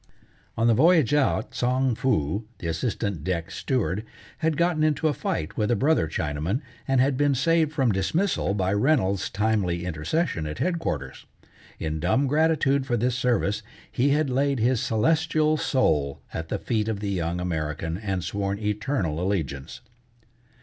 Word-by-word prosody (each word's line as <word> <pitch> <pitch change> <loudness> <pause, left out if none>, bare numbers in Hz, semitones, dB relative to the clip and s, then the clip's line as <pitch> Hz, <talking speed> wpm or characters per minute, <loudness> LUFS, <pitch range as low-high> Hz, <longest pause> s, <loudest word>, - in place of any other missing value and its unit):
On 115 - +2
the 115 - +5
voyage 155 +1 +4
out, 145 -2 +1
Tsang 130 +1 +1
Foo, 105 - 0
the - - -9
assistant 95 - -2
deck 90 +1 -2
steward, 100 0 -1 0.4
had 160 -2 0
gotten 170 -2 +2
into 155 0 +2
a 150 - +2
fight 80 - -3
with 105 -1 +1
a 120 - +3
brother 140 - +2
Chinaman, 80 - -2 0.3
and 135 -1 +2
had 130 +1 +2
been 145 -1 +2
saved 165 +2 +2
from 135 -6 +2
dismissal 100 - 0
by 95 -1 0
Reynolds's 105 -5 +1
timely 100 -5 0
intercession 80 - -1
at 75 - -5
headquarters. 80 - -3 0.5
In 80 -1 -3
dumb 95 - +2
gratitude 145 -2 +2
for 120 -2 +1
this 120 +2 0
service, 120 -5 +1 0.3
he 135 +4 +2
had 145 -1 +2
laid 140 +2 +1
his 120 +1 +2
celestial 155 +6 +2
soul 75 - +1
at 80 0 -5
the - - -1
feet 110 -3 -1
of 110 -3 -2
the 100 -1 -2
young 85 -2 -1
American 80 -1 -3
and 95 -4 -2
sworn 100 +2 -2
eternal 105 - -1
allegiance. 80 -8 -3
110 Hz, 155 wpm, -25 LUFS, 90-140 Hz, 0.5 s, the